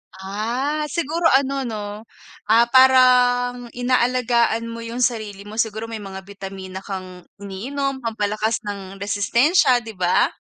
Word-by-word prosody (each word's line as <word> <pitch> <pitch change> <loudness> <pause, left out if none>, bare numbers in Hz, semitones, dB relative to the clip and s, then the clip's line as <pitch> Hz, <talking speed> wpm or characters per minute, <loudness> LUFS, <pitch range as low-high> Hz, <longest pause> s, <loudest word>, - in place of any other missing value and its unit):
Ah, 235 +11 -2
siguro 330 +2 0
ano 270 -1 0
'no, 215 -2 -4 0.6
ah, 230 +2 +5
parang 250 -1 +5
inaalagaan 245 -2 +1
mo 230 0 -7
yung 230 +2 -3
sarili 215 -5 -2
mo. 215 +2 -8
Siguro, 220 -1 -1
may 225 -1 -6
mga 190 -2 -8
bitamina 190 -1 -8
kang 185 -2 -8 0.2
iniinom 265 +8 -3
pampalakas 215 -1 -2
ng 195 -2 -6
resistensya, 245 - +3
'di 225 -1 -8
ba? 180 -1 +2
230 Hz, 125 wpm, -21 LUFS, 205-255 Hz, 0.6 s, ah